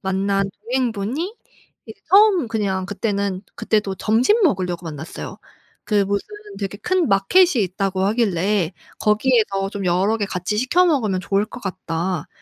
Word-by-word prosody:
만난 195 +1 0
동행분이 255 - -2 0.5
예 - - -6 0.2
처음 390 - +5
그냥 195 -4 -1
그때는 200 -2 -2
그때도 205 -3 0
점심 245 - +2
먹으려고 180 - 0
만났어요. 155 0 -7 0.5
그 205 -2 +2
무슨 200 +1 -2 0.3
되게 200 0 -4
큰 355 - 0
마켓이 290 - +4
있다고 190 +1 -2
하길래 200 -4 +1 0.3
"거기에서 210 -3 +2
좀 200 -2 -5
여러 190 +5 +2
개 210 - -1
같이 195 +2 -3
시켜 345 +10 +3
먹으면 220 - +1
좋을 195 +2 0
것 245 - -10
같다." 180 -4 -3
200 Hz, 300 characters per minute, -21 LUFS, 190-235 Hz, 0.5 s, 처음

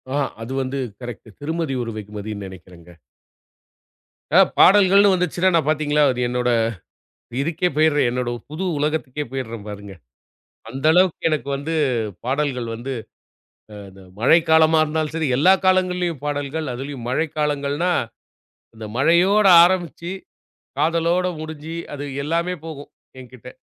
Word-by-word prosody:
ஆ - - +1 0.2
அது 115 +3 -7
வந்து 130 +1 -3 0.2
கரெக்ட். 120 -2 -8
திருமதி 160 0 -3
ஒரு 115 - -5
வெகுமதினு 105 -1 -7
நினைக்கிறேங்க. 90 -2 -14 1.5
அ - - +9 0.2
பாடல்கள்ன்னு 200 0 +6
வந்துச்சுன்னா 180 +1 +1
நான் 155 -2 +1
பார்த்தீங்களா! 150 -1 +2 0.2
என்னோட 125 0 0 0.9
இதுக்கே 165 +3 0
போயிடுறேன். 155 -4 +3
"என்னோட 125 0 -2 0.2
புது 160 +5 -4
உலகத்துக்கே 150 -1 -2
போயிடுறேன் 115 -5 -6
பாருங்க." 100 -1 -9 0.8
அந்த 135 +5 -6
அளவுக்கு 180 -2 +2
"எனக்கு 155 -3 -2
வந்து 145 +4 -4 0.5
பாடல்கள் 130 -2 -1
வந்து 125 +4 -5 0.8
அ - - -10 0.2
த 95 - -15 0.2
மழைக்காலமா 160 +4 +4
இருந்தாலும் 155 0 -2
சரி, 160 -3 -1
எல்லா 155 +7 +5
காலங்கள்லயும் 180 -4 +1
பாடல்கள். 145 +2 -3
அதுலயும் 135 -1 -7
மழை 155 +6 0
காலங்கள்னா 145 +3 0 0.8
அந்த 110 -1 -9
மழையோடு 185 +8 +4
ஆரம்பிச்சு, 175 -1 -1 0.7
காதலோட 170 +2 +1
முடிஞ்சி 155 +1 -7 0.2
அது 145 0 -6 0.2
எல்லாமே 170 +4 -1
போகும் 145 -3 -9 0.3
என்கிட்ட." 125 0 -13
150 Hz, 120 wpm, -21 LUFS, 125-165 Hz, 1.5 s, அ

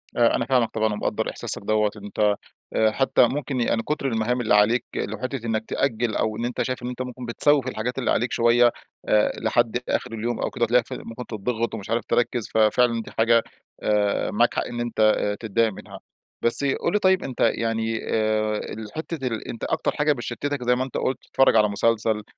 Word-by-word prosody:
آآ 120 -1 +4
أنا - - -1
فاهمك 125 -3 +2
طبعًا 110 -1 0
ومقدّر 105 - -2
إحساسك - - -2
دوّة، 105 0 +1
أنت 105 0 0 0.4
آآ 110 -1 +3
حتى 130 -1 +3
ممكن 135 -2 -2
يعني 115 -1 +1
كتر 150 -2 -2
المهام 120 +1 0
اللي 110 - +1
عليك 110 +4 +3
لو 110 +1 -3
حِتة 130 0 -4
إنك 110 -1 -1
تأجل، 120 -4 -1
أو 110 -1 -1
إن 120 - -2
أنت 125 - -2
شايف 130 -1 -3
إن - - -3
أنت 125 0 -5
ممكن 125 -1 -6
بتسوّف 135 +3 +2
الحاجات 125 +1 -3
اللي 125 - 0
عليك 120 +2 0
شوية، 120 +1 +4 0.4
آآ 105 0 +4
لحد 115 +1 +1
آخر - - -1
اليوم 115 +2 -3
أو - - -1
كده 120 - -3
وتلاقيك 120 0 +3
في - - -5
ممكن 115 +2 -7
تضّغِط 115 +2 -3
ومش 105 -1 -8
عارف 115 -1 0
تركِّز، 120 -1 0
ففعلًا 115 +2 +3
دي - - -11
حاجة 115 0 +3 0.4
آآ 105 -1 +1
معاك - - +2
حق - - 0
إن 120 - -6
أنت 120 -2 -4 0.2
آآ 105 0 -1
تضايق 110 0 0
منها. - - -11 0.4
بس 115 +4 +2
قُل 140 +6 0
لي 210 - +3
طيب 190 -1 +3
أنت 130 -3 -7
يعني 115 -1 0
آآ 110 -1 +1 0.2
الحتة 135 +6 -5
ال 115 -2 -4
أنت 115 - -7
أكتر - - 0
حاجة 150 0 +2
بتشتتك 135 +2 -4
زي 125 0 +3
ما 130 - -1
أنت 130 - -5
قلت، 130 - -1
تتفرج 135 - +3
على 105 -1 +5
مسلسل، 110 0 +1
115 Hz, 205 wpm, -24 LUFS, 110-125 Hz, 0.4 s, على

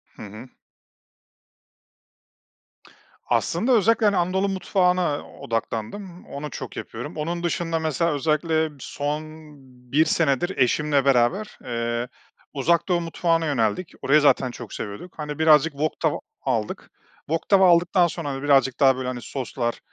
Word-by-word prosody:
Hı - - -13
hı. 110 +4 -10 2.8
Aslında 225 +10 0
özellikle, 225 0 +4
hani, 205 -2 +3
Anadolu 190 +3 +1
mutfağına 180 -4 +1
odaklandım. 115 - -4
Onu 150 +2 -6
çok - - -8
yapıyorum. - - -7
Onun 170 +3 -3
dışında 165 -1 -1
mesela 160 +1 0
özellikle 155 +2 +1
son 145 +3 -3 0.7
1 155 +3 +4
senedir 160 +3 +1
eşimle 140 +2 +2
beraber, 140 - +2
eee, 120 0 -2 0.5
Uzak 160 +4 +1
Doğu 175 -2 +1
mutfağına 165 0 0
yöneldik. 135 - 0
Orayı 150 +3 +4
zaten 135 -3 +3
çok 120 -2 -9
seviyorduk. 105 - -7
Hani, 150 0 -5
birazcık 160 0 +5
wok 150 +2 -2
tava 160 -3 0 0.2
aldık. 115 -5 -2 0.4
Wok 165 +1 -2
tava 190 -2 +6
aldıktan 175 +1 +4
sonra, 165 -3 -5
hani, 135 0 -5
birazcık 135 -3 +3
daha, 135 -2 +5
böyle, 130 0 -4
hani, 125 -1 -4
soslar 125 -3 -4
155 Hz, 135 wpm, -24 LUFS, 130-175 Hz, 2.8 s, tava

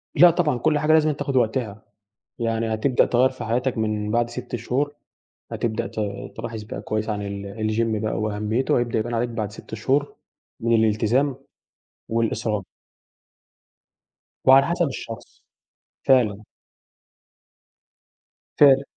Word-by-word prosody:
لا 175 +4 +8
طبعًا 155 -7 +1
كل 150 +5 +2
حاجة 155 +1 +3
لازمًا 155 -1 +4
تاخد 140 -1 -3
وقتها، 110 -3 0 0.6
يعني 115 -1 -1
هتبدأ 125 +4 +2
تغيّر 125 +2 +3
في 130 - -8
حياتك 125 +2 0
من 105 -1 -1
بعد 120 +1 +1
6 120 0 -5
شهور 140 +6 -2 0.6
هتبدأ 115 0 -2
ت - - -15 0.4
تلاحظ 115 -1 -5
بقى 100 -1 -7
كويّس 110 +1 -2
عن 105 -1 -2
ال 100 +2 -4
الgym 110 -1 0
بقى 110 - -1
وأهميته، 110 +4 0
وهيبدأ 120 -2 +1
يبان 120 +2 -3
عليك 120 +1 0
بعد 110 -3 -3
6 110 - -12
شهور 135 +6 0 0.4
من 115 0 +2
الالتزام 115 +5 +2 0.7
والإصرار. 110 -2 0 1.8
وعلى 135 +1 +7
حسب 170 -1 +1
الشخص 115 -4 -8 0.7
فعلًا. 110 -6 +3 2.1
فعلًا. 140 -2 +7
115 Hz, 125 wpm, -23 LUFS, 110-130 Hz, 2.1 s, لا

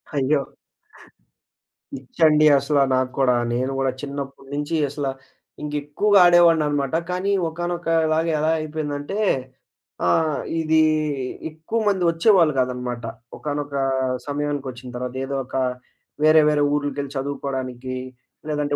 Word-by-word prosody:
అయ్యో! 140 +1 +2 1.5
పిచ్చండి 150 +3 +2
అసల 140 +1 +1 0.2
నాకు 130 0 0
కూడా. 125 -2 +4 0.2
నేను 130 +2 -1
కూడా 135 -1 +1
చిన్నప్పడు 140 -1 -7
నుంచి 145 +3 -2
అసల 145 0 -3 0.6
ఇంకెక్కువగా 150 +8 +2
ఆడేవాడినినమాట. 160 -5 +4 0.2
కానీ 185 +2 -1 0.2
ఒకానొకలాగా 165 -1 0
ఎలా 155 +1 +1
అయిపోయిందంటే, 155 +3 -4 0.9
ఆ! - - +4 0.5
ఇది 160 0 +3 0.7
ఎక్కువమంది 190 +5 -1
వచ్చేవాళ్ళు 165 -2 +4
కాదనమాట. 125 -1 -2 0.3
ఒకానొక 145 -1 -4 0.5
సమయానికొచ్చిన 140 -4 -4
తర్వాత, 125 0 -5
ఏదో 140 +1 -4
ఒక - - -10 0.7
వేరే 155 0 +7
వేరే 150 -1 +2
ఊర్లకెళ్ళి 145 -1 -2
చదువుకోవడానికి, 130 -2 -4 0.5
లేదంటే 145 -1 -1
145 Hz, 100 wpm, -22 LUFS, 135-160 Hz, 1.5 s, వేరే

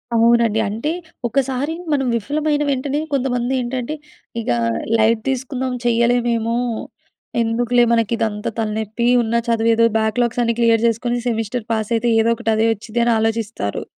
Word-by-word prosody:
అవునండి. 230 -1 +4
అంటే, 230 +9 -2 0.4
ఒకసారి 270 +4 -1 0.2
మనం 270 -3 +1
విఫలమైన 295 +6 0
వెంటనే 275 +2 -1
కొంతమంది 250 -2 0
ఏంటంటే, 250 +3 -3 0.5
ఇగా 120 - 0 0.4
లైట్ 220 0 +3
తీసుకుందాం 260 0 -2
చేయలేమేమో, 235 -1 +1 0.8
ఎందుకులే 240 +1 +2
మనకిదంతా 225 -1 0
తలనెప్పి 220 +1 -2 0.2
ఉన్న 230 0 -1
చదువు 230 -1 +2
ఏదో 230 +1 +4
బ్యాక్‌లాగ్స్ 230 +2 0
అన్నీ 235 -1 +1
క్లియర్ 230 -1 +4
చేసుకొని 240 +2 -1
సెమిస్టర్ 225 0 -2
పాస్ 220 -2 -1
అయితే 230 +1 0
ఏదో 225 - +2
ఒకటి 230 -1 -3
అదే 220 +1 +2
వచ్చిద్దని 235 +2 -1
ఆలోచిస్తారు. 220 - -2
235 Hz, 130 wpm, -19 LUFS, 225-245 Hz, 0.8 s, అవునండి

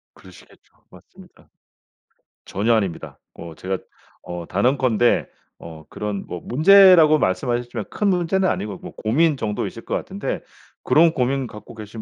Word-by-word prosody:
그러시겠죠. 95 -1 -19 0.2
맞습니다. - - -19 1.0
전혀 110 +4 0
아닙니다. 100 -7 -3
어 85 -1 -10
제가 95 +4 -4 0.5
어 90 -1 -7
단언컨대 120 +2 +1 0.3
어 80 -2 -11
그런 105 -2 -5
뭐 90 - -6
문제라고 165 0 +6
말씀하셨지만 120 +2 -2
큰 210 - -2
문제는 185 +1 +1
아니고 100 -2 -3
뭐 - - -10
고민 145 +7 +1
정도이실 105 -3 -4
것 - - -2
같은데 - - -4 0.4
그런 165 +1 +4
고민 130 -1 -1
갖고 105 +2 -12
계신 110 0 -9
120 Hz, 315 characters per minute, -21 LUFS, 100-155 Hz, 1.0 s, 문제라고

